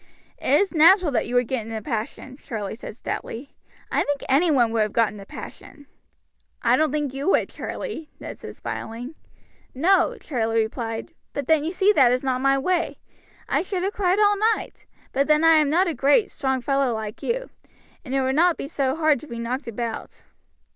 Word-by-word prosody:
"It 280 - +3
was 395 +2 +1
natural 335 +1 +6
that 250 - 0
you 245 +1 0
should 245 -1 +2
get 255 -3 -2
in - - -7
a 220 - -3
passion," 230 +1 -5
Charlie 220 -7 -5
said 220 -1 -9
stoutly. 250 +3 -6 0.4
"I - - +2
think 285 -1 -2
any 295 +6 +3
one 245 -6 +3
would 225 -1 +1
have 210 -1 0
got 230 -2 +3
in 210 - -10
a 195 - -11
passion." 290 -2 -10 0.8
"I - - +4
don't 310 -2 +2
think 295 -3 -2
you 275 +6 -2
would, - - +2
Charlie," 325 -10 -6
Ned - - -8
said, - - -9
smiling. 240 +6 -6 0.6
"No," 345 +3 +3
Charlie 225 -5 0
replied; 225 +6 -5 0.2
"but 285 - -3
then 315 0 +3
you 325 - -2
see 385 +3 +3
that 260 -9 +5
is 255 +1 0
not 255 -1 0
my 275 0 +3
way. 345 +5 0 0.5
I - - +1
should 370 -1 -3
have 395 +2 -1
cried 375 -1 +1
all 410 -1 +4 0.2
night; - - -10 0.2
but 275 +1 +1
then 305 +1 +4
I 325 -1 +7
am 300 -2 +3
not 355 +5 +3
a 335 - -1
great, 300 - +3
strong 265 -3 -1
fellow 275 0 +1
like 215 -1 -6
you, - - -2 0.5
and 270 -2 -4
it 270 - +2
would 260 0 +1
not 340 +3 +3
be - - -5
so 275 -2 -1
hard 310 -4 +2
to 305 - -12
be 235 - -7
knocked 240 +4 -4
about." 230 0 -5
275 Hz, 210 wpm, -24 LUFS, 240-325 Hz, 0.8 s, I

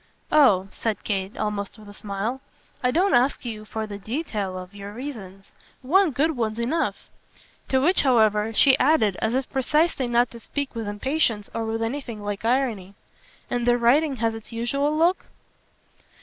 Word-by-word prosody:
"Oh," 205 -11 +5
said 225 -2 -3
Kate 195 -1 -3
almost 210 -1 -3
with 215 -1 -14
a 205 - -11
smile, 210 +6 -4 0.4
"I 250 - +3
don't 360 +9 +2
ask 250 +2 +2
you 215 -2 -6
for 220 +1 -4
the 205 -1 -7
detail 215 - -3
of 185 +1 -9
your 200 0 -8
reasons. 210 -7 -8 0.3
One 365 +7 +4
good 295 +4 +1
one's 220 -2 -2
enough." 260 +8 -1 0.6
To 265 - +2
which 340 +7 +3
however 220 -4 +3
she 265 +4 +6
added 250 -9 +3
as 220 +2 -1
if 265 0 -1
precisely 300 +1 +1
not 240 0 +2
to 235 - -10
speak 280 +4 -4
with 225 -3 -4
impatience 220 0 -1
or 230 0 -2
with 225 0 -2
anything 230 -3 -4
like 205 0 -4
irony: 225 -6 0 0.5
"And 245 0 -2
the 240 0 +4
writing 270 +5 +3
has 230 -1 0
its 225 +1 -10
usual 275 +6 0
look?" 345 +4 +2
235 Hz, 170 wpm, -24 LUFS, 210-270 Hz, 0.6 s, she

